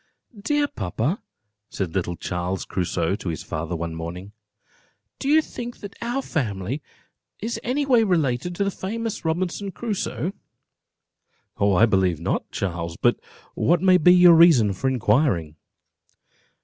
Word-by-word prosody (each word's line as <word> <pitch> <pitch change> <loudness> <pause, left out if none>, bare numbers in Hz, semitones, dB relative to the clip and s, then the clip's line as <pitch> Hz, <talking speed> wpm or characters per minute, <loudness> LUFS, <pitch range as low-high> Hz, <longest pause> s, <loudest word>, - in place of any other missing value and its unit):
"Dear 290 +6 +1
papa," 115 - -2 0.5
said 95 -4 -4
little 90 -2 -1
Charles 90 +2 -3
Crusoe 90 -1 -1
to 95 - -5
his 80 - -4
father, 85 +2 -4
one 85 0 -4
morning, 85 +4 -7 0.9
"do 275 - -2
you 310 +1 +5
think 240 -3 -7
that 200 -1 -8
our 240 +4 -2
family 115 - -3 0.6
is 225 +3 -3
any 275 +4 -1
way 250 -4 +4
related 170 - 0
to 200 - 0
the 200 - 0
famous 225 +4 -4
Robinson 180 +4 -2
Crusoe?" 195 -5 -3 1.3
"I 100 +1 +5
believe 95 -6 +1
not, 85 - -2
Charles: 85 -3 -4
but - - +2 0.3
what 175 +1 +2
may 185 -1 +6
be 180 +3 +6
your 180 -1 +8
reason 160 - +6
for 125 +8 -2
inquiring?" 105 - +1
135 Hz, 135 wpm, -23 LUFS, -, 1.3 s, your